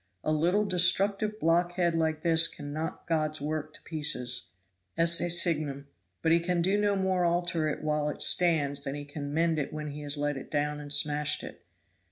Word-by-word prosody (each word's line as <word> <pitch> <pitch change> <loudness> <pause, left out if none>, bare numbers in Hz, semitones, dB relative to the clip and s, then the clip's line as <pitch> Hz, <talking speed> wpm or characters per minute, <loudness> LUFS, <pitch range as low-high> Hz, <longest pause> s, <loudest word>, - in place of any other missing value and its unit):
A - - 0
little 175 +7 +2
destructive 200 +3 +1
blockhead 175 +1 +1
like 160 -1 0
this 165 0 +3
can 145 -2 -8
knock 160 +3 -5
God's 155 -2 -1
work 155 +1 -4
to - - -14
pieces 125 - -1 0.5
ecce 170 +1 +4
signum 150 -5 +1 0.3
but 160 - +2
he 170 - +5
can 175 0 -1
no 205 +3 +1
more 190 -2 0
alter 170 -2 0
it 150 - -5
while 150 -1 0
it 150 - -2
stands 145 -5 +2
than 140 0 -4
he 145 0 -6
can 145 0 -6
mend 165 +1 +1
it 140 - -3
when 150 -1 -5
he 145 +1 -7
has 145 0 -2
let 145 -1 -1
it 135 - -9
down 150 0 -1
and 145 -1 -9
smashed 150 +1 +2
it. - - -10
155 Hz, 190 wpm, -28 LUFS, 145-175 Hz, 0.5 s, he